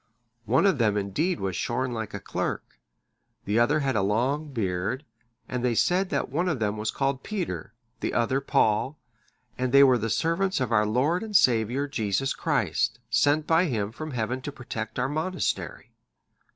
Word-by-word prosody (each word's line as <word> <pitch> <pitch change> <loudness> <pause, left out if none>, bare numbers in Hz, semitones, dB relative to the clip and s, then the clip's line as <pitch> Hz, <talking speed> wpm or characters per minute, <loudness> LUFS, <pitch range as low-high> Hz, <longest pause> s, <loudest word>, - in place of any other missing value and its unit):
One 125 - +3
of 190 -9 +3
them 105 -3 +2
indeed 150 - -1
was 95 -2 -2
shorn 125 +6 -1
like 110 -3 -4
a - - -4
clerk, - - -4 0.7
the 105 +4 +1
other 145 +6 +3
had 135 -3 0
a 110 - +2
long 130 +10 0
beard; 100 - -2 0.4
and 125 -1 -3
they 120 -2 +1
said 180 - +2
that - - -1
one 175 +6 0
of 160 - 0
them 105 -2 -1
was 110 0 -2
called 135 -1 -1
Peter, 115 - -4 0.2
the - - -2
other 130 +3 +1
Paul; 135 +1 +1 0.6
and 130 -1 0
they 140 +1 +8
were 130 -3 +5
the 115 +1 -2
servants 170 - +1
of 125 -3 -1
our 105 -2 +3
Lord 140 +11 +1
and 220 -2 -6
Saviour 125 - +3
Jesus 115 -1 -1
Christ, - - 0
sent 150 +1 +3
by 165 +3 +3
Him 110 - -1
from 155 +7 -7
Heaven 125 -1 -2
to 145 - -5
protect 120 -4 -6
our 125 +1 +1
monastery." 185 - -3
130 Hz, 180 wpm, -26 LUFS, 110-150 Hz, 0.7 s, they